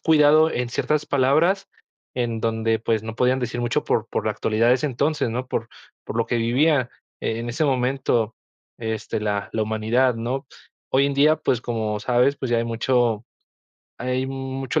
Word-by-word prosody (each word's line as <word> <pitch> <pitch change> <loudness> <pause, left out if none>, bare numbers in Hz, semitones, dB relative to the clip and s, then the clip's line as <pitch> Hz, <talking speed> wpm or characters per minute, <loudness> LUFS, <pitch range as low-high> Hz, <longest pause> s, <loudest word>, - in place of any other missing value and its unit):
cuidado 155 0 +5
en 125 -4 -2
ciertas 150 +4 -1
palabras, 155 +8 +2 0.5
en 120 -3 -2
donde, 110 0 0
pues, 110 -1 0
no 110 0 -6
podían 125 +2 +2
decir 120 -1 -3
mucho 120 0 0
por - - 0
por - - -2
la - - +1
actualidad 110 +2 +1
de 125 - +6
ese 130 +4 -1
entonces, 145 -1 0
¿no? 125 +2 -3
Por 115 -2 -3 0.4
por - - -6
lo 115 - +1
que 120 - 0
vivía, 125 +3 +2 0.3
eh, 110 - -2
en 120 +1 -4
ese 145 +7 0
momento, 125 -4 +1 0.4
este, 110 -2 -3
la 105 -1 -2
la 110 - 0
humanidad, 110 +4 +1
¿no? 125 +4 -3 0.4
Hoy 135 +1 +3
en 140 - -1
día, 150 +3 +5
pues, 130 -6 0
como 110 -3 -2
sabes, 125 +5 +2
pues, 130 - -4
ya 120 - +3
hay 115 - 0
mucho 115 -1 +1 0.7
hay 125 +1 -1
mucho 135 +2 -3
125 Hz, 180 wpm, -23 LUFS, 115-135 Hz, 0.7 s, de